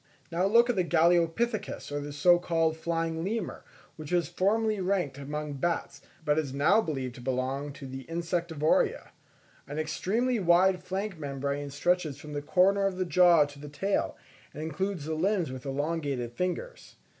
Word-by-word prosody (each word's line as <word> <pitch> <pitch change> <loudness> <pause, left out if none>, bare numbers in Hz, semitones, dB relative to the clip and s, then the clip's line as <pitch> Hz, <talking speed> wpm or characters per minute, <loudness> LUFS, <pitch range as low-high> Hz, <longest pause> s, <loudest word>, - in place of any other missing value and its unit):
Now 175 +3 +1
look 235 +3 +5
at 245 - +1
the 185 - +2
Galeopithecus 175 +6 +1
or 145 0 -4
so 175 +4 +5
called 165 -2 +1
flying 165 0 -2
lemur, 220 +5 -3 0.3
which 155 0 -8
was 175 -2 +2
formerly 210 +4 +1
ranked 180 -8 -1
among 150 +1 -4
bats, 170 +4 -2 0.2
but 150 +1 +3
is 140 -4 -3
now 155 +10 +4
believed 135 - -3
to - - -10
belong 130 +3 -2
to 140 - -10
the 130 0 -7
Insectivora. 165 -2 0 0.6
An 145 - -6
extremely 215 +10 0
wide 180 0 +4
flank 190 0 -4
membrane 140 0 -3
stretches 155 0 0
from 150 +1 -9
the 145 - -2
corners 195 +5 +3
of - - -10
the 185 - 0
jaw 170 -2 +6
to 145 0 -12
the 150 0 -8
tail, 195 +8 -1 0.4
and 155 - -5
includes 175 +1 -3
the 160 - -2
limbs 175 -2 0
with 130 -1 -6
the 140 - -6
elongated 140 -4 -2
fingers. 180 - -4
165 Hz, 165 wpm, -29 LUFS, 145-185 Hz, 0.6 s, jaw